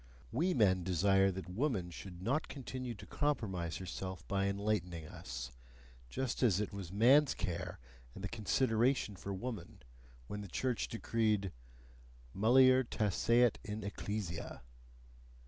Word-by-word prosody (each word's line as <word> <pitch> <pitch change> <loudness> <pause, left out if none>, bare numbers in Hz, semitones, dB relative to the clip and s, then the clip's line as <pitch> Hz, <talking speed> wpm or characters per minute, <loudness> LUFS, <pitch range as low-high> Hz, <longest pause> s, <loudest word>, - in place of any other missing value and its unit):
We 175 +8 +1
men 95 -6 +4
desire 95 +2 +4
that 95 0 -5
woman 95 -3 -1
should 90 0 -9
not 140 +9 0
continue 130 -3 -5
to 100 0 -11
compromise 95 - -1
herself 95 -1 -6
by 100 0 +1
enlightening 100 -5 -1
us; 60 -4 -7 0.6
just 130 - -2
as 105 -7 +4
it 105 - -2
was 95 -4 -6
man's 130 +8 +5
care 90 -3 -3 0.4
and 95 - -8
the - - -1
consideration 115 +1 +1
for 100 - -6
woman, 100 -2 -6 0.4
when 105 +10 -5
the 100 - -7
church 125 +6 -1
decreed: 110 -4 0 0.8
mulier 130 +5 +6
taceat 115 +2 +2
in 110 -1 -5
ecclesia. 100 -8 -4
105 Hz, 130 wpm, -35 LUFS, 95-120 Hz, 0.8 s, mulier